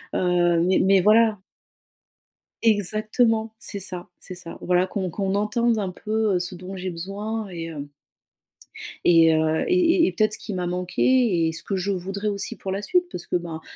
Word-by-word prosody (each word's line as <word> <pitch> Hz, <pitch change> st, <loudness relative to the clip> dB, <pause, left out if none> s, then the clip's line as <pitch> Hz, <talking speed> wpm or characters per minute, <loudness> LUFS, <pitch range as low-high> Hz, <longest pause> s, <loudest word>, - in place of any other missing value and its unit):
heu, 175 Hz, -2 st, +2 dB
mais 185 Hz, +1 st, +3 dB
mais 195 Hz, 0 st, +4 dB
voilà. 215 Hz, +2 st, +4 dB, 1.3 s
Exactement. 220 Hz, +1 st, +1 dB
C'est 205 Hz, -, -3 dB
ça. 180 Hz, -2 st, -3 dB
C'est 185 Hz, -, -9 dB
ça. 175 Hz, -2 st, -9 dB
Voilà 180 Hz, 0 st, +2 dB
qu'on 190 Hz, 0 st, -3 dB
qu'on 195 Hz, +2 st, -2 dB
entende 220 Hz, +2 st, +1 dB
un 195 Hz, -3 st, -2 dB
peu, 215 Hz, +2 st, -1 dB
heu, -, -, +2 dB
ce 180 Hz, +1 st, -4 dB
dont 185 Hz, +2 st, -8 dB
j'ai 185 Hz, 0 st, -4 dB
besoin 200 Hz, +5 st, -5 dB
et 170 Hz, -2 st, -6 dB
hem 145 Hz, -3 st, -7 dB, 1.2 s
et 165 Hz, -2 st, +6 dB
heu, 160 Hz, 0 st, +1 dB
et -, -, +2 dB
et 340 Hz, -1 st, +4 dB
et -, -, 0 dB
peut-être 215 Hz, -1 st, +1 dB
ce -, -, -3 dB
qui 210 Hz, -, -6 dB
m'a 180 Hz, -1 st, -2 dB
manqué 180 Hz, +1 st, +1 dB
et -, -, 0 dB
ce 165 Hz, +1 st, -7 dB
que 200 Hz, -, -3 dB
je 190 Hz, +2 st, -1 dB
voudrais 195 Hz, +2 st, -3 dB
aussi 200 Hz, -1 st, -3 dB
pour 195 Hz, -, -7 dB
la 195 Hz, +1 st, -2 dB
suite 360 Hz, -, +1 dB
parce 175 Hz, -, -7 dB
que -, -, +1 dB
ben, 165 Hz, -2 st, -7 dB
190 Hz, 190 wpm, -23 LUFS, 175-215 Hz, 1.3 s, et